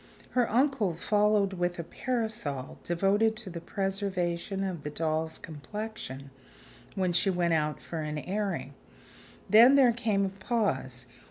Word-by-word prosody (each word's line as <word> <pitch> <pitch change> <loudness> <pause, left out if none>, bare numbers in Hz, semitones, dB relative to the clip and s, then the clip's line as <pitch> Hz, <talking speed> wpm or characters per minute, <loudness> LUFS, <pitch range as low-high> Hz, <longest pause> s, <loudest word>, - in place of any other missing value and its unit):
Her 245 -2 +2
uncle 240 - +2
followed 205 +1 +2
with 175 -1 -1
a 170 - -3
parasol, 215 - -3
devoted 200 +6 +2
to 215 -4 -5
the 170 -1 -6
preservation 195 -1 -2
of 185 -5 -3
the 150 - -4
doll's 160 +1 -1
complexion 155 -4 -7 0.6
when 185 -3 0
she 185 +3 +3
went 175 -2 +1
out 150 -1 0
for 165 - -6
an 150 0 -3
airing. 195 +5 -3 0.7
Then 235 +6 +8
there 255 -4 +6
came 215 -4 +1
a - - -1
pause. 190 - -2
190 Hz, 140 wpm, -29 LUFS, 165-215 Hz, 0.7 s, Then